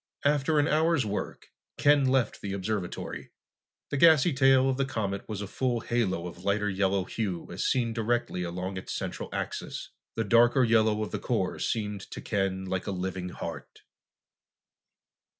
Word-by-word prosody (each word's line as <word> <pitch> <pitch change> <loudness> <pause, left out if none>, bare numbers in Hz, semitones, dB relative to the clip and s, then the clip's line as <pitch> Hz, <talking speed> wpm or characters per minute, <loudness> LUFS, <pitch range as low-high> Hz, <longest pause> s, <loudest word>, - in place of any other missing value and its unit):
After 145 +1 +2
an 145 0 +4
hour's 160 -3 +2
work, 105 0 -5 0.3
Ken 145 -1 +4
left 130 -2 +1
the 100 -1 -4
observatory. 100 -2 -4 0.6
The 145 - 0
gassy 160 +1 +6
tail 135 0 +5
of 130 -1 +1
the 135 - +2
comet 105 -7 -3
was 105 -2 -4
a - - -5
full 120 +2 -1
halo 105 -8 0
of 90 0 -8
lighter 100 +1 +1
yellow 95 0 +1
hue, 95 -4 -3
as - - -3
seen 120 -3 +1
directly 115 -4 -1
along 90 +2 -4
its 95 - -5
central - - -4
axis. - - -4 0.2
The 115 - 0
darker 120 +3 +5
yellow 110 -2 +3
of 105 - -5
the - - -3
core - - -1
seemed 105 -3 -2
to - - -7
Ken 95 -2 -1
like 95 +1 -3
a - - -1
living 95 -1 -3
heart. - - -8
110 Hz, 165 wpm, -28 LUFS, 95-130 Hz, 0.6 s, gassy